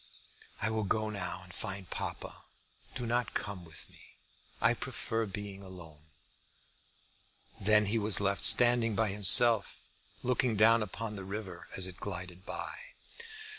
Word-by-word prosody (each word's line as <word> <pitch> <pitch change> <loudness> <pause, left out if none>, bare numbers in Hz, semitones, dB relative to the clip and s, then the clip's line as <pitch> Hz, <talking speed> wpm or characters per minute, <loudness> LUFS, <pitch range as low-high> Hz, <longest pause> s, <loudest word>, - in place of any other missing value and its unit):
I 110 - 0
will 110 0 -1
go 110 +2 -1
now 90 -2 -6
and 90 -2 -14
find 95 -2 -6
papa. - - -7 0.5
Do 125 -2 -4
not 120 +1 -2
come 100 -3 -5
with 80 -2 -13
me. - - -20 0.4
I - - +3
prefer 115 -1 -4
being 100 -1 -8
alone." 85 -6 -13 1.5
Then 105 +1 +3
he 110 +3 0
was 105 -2 +5
left 100 -1 -1
standing 120 -3 +6
by 110 0 +1
himself, 105 +2 +5 0.5
looking 125 -2 +1
down 115 +2 +5
upon 105 +1 -5
the 95 - -7
river 95 -2 -7
as 95 - +4
it 95 -1 -7
glided 90 -1 -8
by. - - -6
100 Hz, 140 wpm, -31 LUFS, 95-110 Hz, 1.5 s, standing